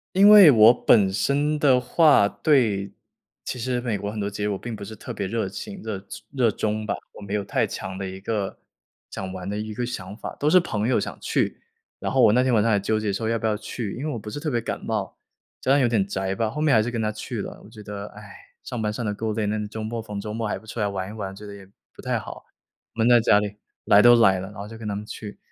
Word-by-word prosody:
因 200 +2 +7
为 205 -6 +10
我 110 -2 +8
本 100 -6 +4
身 145 +8 0
的 135 -3 +5
话， 135 0 +4 0.2
对 110 -10 +2 0.5
其 125 - -5
实 125 +1 -1
美 115 -4 -1
国 100 0 -4
很 110 - -7
多 100 -1 -2
节 105 0 -4
日 - - +1
我 100 -2 -1
并 120 +4 -7
不 105 - -8
是 110 - -9
特 - - -8
别 100 - -3
热 110 -1 -2
情、 200 - -8
热 100 -3 -6 0.2
热 125 -5 +2
衷 110 +1 -2
吧， 100 - -1 0.2
我 - - -13
没 100 0 -6
有 105 -1 0
太 - - 0
强 95 0 -6
的 95 0 -4
一 95 0 -8
个， 100 -2 -3 0.5
想 95 -1 -5
玩 95 +1 -6
的 105 - -3
一 110 0 -4
个 120 +3 -2
想 100 -5 -6
法， - - -7
都 150 - +2
是 185 - +6
朋 110 -9 -2
友 125 - +2
想 - - -6
去。 - - -1 0.4
然 - - -3
后 - - +4
我 - - +7
那 125 +3 +3
天 130 - +1
晚 110 -2 +4
上 115 - +2
还 100 - +3
纠 110 +2 0
结 110 -2 -1
说 110 +3 -2
要 115 +1 +1
不 110 - -5
要 110 -1 +1
去， 110 -1 -5
因 145 - -4
为 155 - -2
我 - - -4
不 105 -1 -8
是 145 - -5
特 155 +1 -2
别 120 -3 0
感 - - -4
冒， 105 -3 -3 0.4
加 130 - 0
上 140 0 +5
有 - - +4
点 110 -5 +1
宅 95 -1 -2
吧， 110 +2 -1
后 150 +6 -5
面 155 -3 +3
还 110 - +5
是 115 - -2
跟 115 -2 -3
他 110 0 0
去 110 +1 -5
了。 - - -8
我 - - -14
觉 110 -2 -12
得， 100 0 -6
哎， 105 - -10 0.4
上 120 -3 -5
班 105 -1 -1
上 120 0 -4
得 105 - -1
够 110 +1 -3
累， 105 0 -1
那 105 0 -2
周 110 +1 -6
末 115 +1 -4
逢 105 -2 -7
周 105 +1 -6
末 115 0 -2
还 105 - -2
不 100 - -15
出 110 +1 -7
来 105 - +1
玩 95 -1 -4
一 - - -8
玩， 95 -3 -6
觉 105 +2 -11
得 100 - -9
也 100 -1 -12 0.3
不 - - -13
太 - - -1
好， - - -9 0.5
闷 115 +1 +2
在 120 -1 +7
家 105 -2 +4
里。 105 0 -5 0.3
来 100 - +6
都 120 +1 +8
来 95 -5 +4
了， 95 - -6
然 105 - -15
后 100 +1 -7
就 115 +1 -10
跟 110 - -6
他 100 - -2
们 105 +1 -6
去， 105 -1 -8
110 Hz, 310 characters per minute, -24 LUFS, 100-120 Hz, 0.5 s, 为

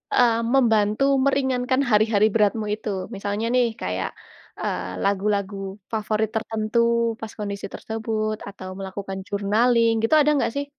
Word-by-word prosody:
eee, 235 -2 +4
membantu 225 -3 +3 0.2
meringankan 265 -1 +1
hari-hari 215 0 +4
beratmu 215 0 +2
itu? 215 0 -6 0.3
Misalnya 205 +2 -2
nih, 250 -1 +4 0.2
kayak, 90 -1 -2 0.5
eee, 90 - -3
lagu-lagu 200 0 0 0.4
favorit 215 -1 0
tertentu, 220 +1 -1 0.4
pas 225 -1 -6
kondisi 200 -1 -4
tersebut, 220 -1 -3
atau 195 -2 -9
melakukan 195 0 -5
journaling, 225 +3 +2
gitu. 225 - +2
Ada 300 +1 +4
enggak 275 - +1
sih? 285 0 -1
215 Hz, 130 wpm, -23 LUFS, 200-230 Hz, 0.5 s, eee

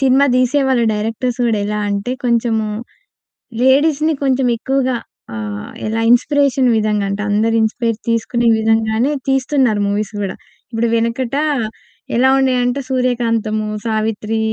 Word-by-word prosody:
Cinema 270 +1 +4
తీసేవాళ్ళు 255 -1 +2
directors 225 +4 -2
కూడా 220 -3 +1
ఎలా 210 0 -2
అంటే 200 +5 -2
కొంచెము 230 -2 +1 1.0
లేడీస్‌ని 300 +4 +3
కొంచెం 265 -1 +2
ఎక్కువగా 260 -1 0 0.4
ఆహ్, 105 -1 -5 0.2
ఎలా 225 +1 -1
ఇన్స్‌పిరేషన్‌ 270 +1 +3
విధంగా 210 -1 0
అంటే 200 +1 -3
అందరు 220 +2 +1
ఇన్స్‌పైర్ 225 0 -1
తీసుకునే 235 +1 +1
విధంగానే 225 +4 +1 0.2
తీస్తున్నారు 265 -4 +1
మూవీస్ 205 +1 -2
గూడా. 195 - -4 0.4
ఇబ్బుడు 230 +1 0
వెనకట 230 +3 -1 0.8
ఎలా 255 +2 +4
ఉండేయంటే 255 0 +1
సూర్యకాంతము, 230 -4 0 0.2
సావిత్రి 220 0 -1
235 Hz, 115 wpm, -17 LUFS, 220-260 Hz, 1.0 s, Cinema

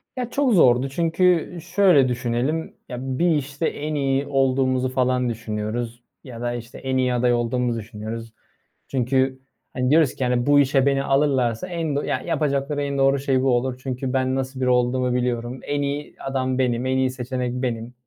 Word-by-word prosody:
Ya, 250 -2 -3
çok 270 -3 +1
zordu 130 -5 +4
çünkü 170 +3 +2
şöyle 175 -5 +4
düşünelim, 125 +6 -1 0.2
ya, 125 - -5
bir 135 +6 +1
işte 145 +2 -3
en 150 +1 -4
iyi 135 -1 0
olduğumuzu 130 -2 +1
falan 125 -1 +1
düşünüyoruz 115 +1 -4 0.2
ya 120 -3 -9
da, 120 0 -1
işte, 120 0 -8
en 130 0 -2
iyi 125 -1 +1
aday 125 0 +2
olduğumu 120 0 0
düşünüyoruz. 115 +1 -7 0.5
Çünkü, 130 +1 0 0.3
hani, 125 0 0
diyoruz 155 -2 +4
ki, - - -3
hani, 125 -1 +1
bu 145 0 +5
işe 135 -1 +3
beni 140 -1 +2
alırlarsa 135 -1 +1
en 165 -5 -2
do 145 - +1
ya - - -2
yapacakları 145 -3 -1
en 140 -1 -2
doğru 135 0 +3
şey 135 -1 +1
bu 135 - +2
olur. 125 +1 -2
Çünkü 130 -1 -3
ben 130 0 +1
nasıl 130 0 -3
biri 130 - +2
olduğumu 125 0 +2
biliyorum. 125 0 -2
En 145 0 -2
iyi 145 +1 -3
adam 130 -1 -2
benim, 125 -1 0
en 130 0 +1
iyi 130 0 +2
seçenek 125 -1 -3
benim. 125 -2 -3
130 Hz, 180 wpm, -23 LUFS, 125-140 Hz, 0.5 s, bu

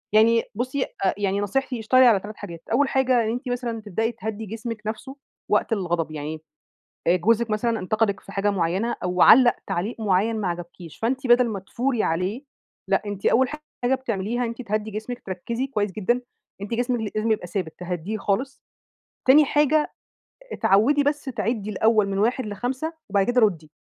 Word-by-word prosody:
يعني 230 +1 +5
بُصي، 255 +4 -1 0.2
آآ 190 - +3
يعني 200 -1 0
نصيحتي، 250 +4 -1
اشتغلي 255 +4 +5
على 225 -5 +6
3 210 +2 -9
حاجات. 170 -1 -8
أول 275 +5 +3
حاجة، 255 -3 +3
إن 220 - -1
أنتِ 250 +3 -4
مثلًا 240 -2 -3
تبدئي 220 +2 -1
تهدي 220 -2 -5
جسمِك 225 +1 -6
نفسه 230 +5 -5 0.4
وقت - - +2
الغضب، 175 -6 -1
يعني 155 +1 -5 0.7
آآ، 175 - +5
جوزِك 225 +5 +2
مثلًا 225 +1 0
انتقِدك 215 +1 0
في - - -13
حاجة 200 +1 0
معينة 190 +5 0
أو 180 0 0
علّق 245 0 +8
تعليق 195 +4 -2
معين 215 +2 +1
ما 195 - -1
عجبكيش، 175 -1 -7
فأنت 260 +4 -1
بدل 240 0 +5
ما 205 -3 -3
تثوري 240 +5 -1
عليه، 185 - -1 0.5
لأ، - - +3
أنتِ 205 -1 -5
أول 255 +1 +4 0.3
حاجة 250 +2 +3
بتعمليها، 240 -1 -2
أنتِ 230 +2 -5
تهدّي 215 -1 -2
جسمِك، 220 +4 -5
تركزي 230 +8 -3
كويس 210 -6 -1
جدًا، 225 +6 0 0.4
أنتِ 200 +3 -5
جسمك 240 -2 -1
لازم 215 +1 +1
يبقى 210 -5 -1
ثابت، 175 -4 -3
تهديه 180 +4 -4
خالص. 240 +7 -2 0.7
تاني 290 +4 +7
حاجة، 300 +2 +2 0.6
اتعودي 255 +10 +3
بس 290 +1 0
تعِدِّي 220 -4 -2
الأول 215 0 +3
من 195 - -2
1 235 +5 +1
ل5 250 - -3 0.2
وبعد 200 -2 +2
كده 245 0 +3
ردي. 165 -8 +1
220 Hz, 175 wpm, -24 LUFS, 195-245 Hz, 0.7 s, علّق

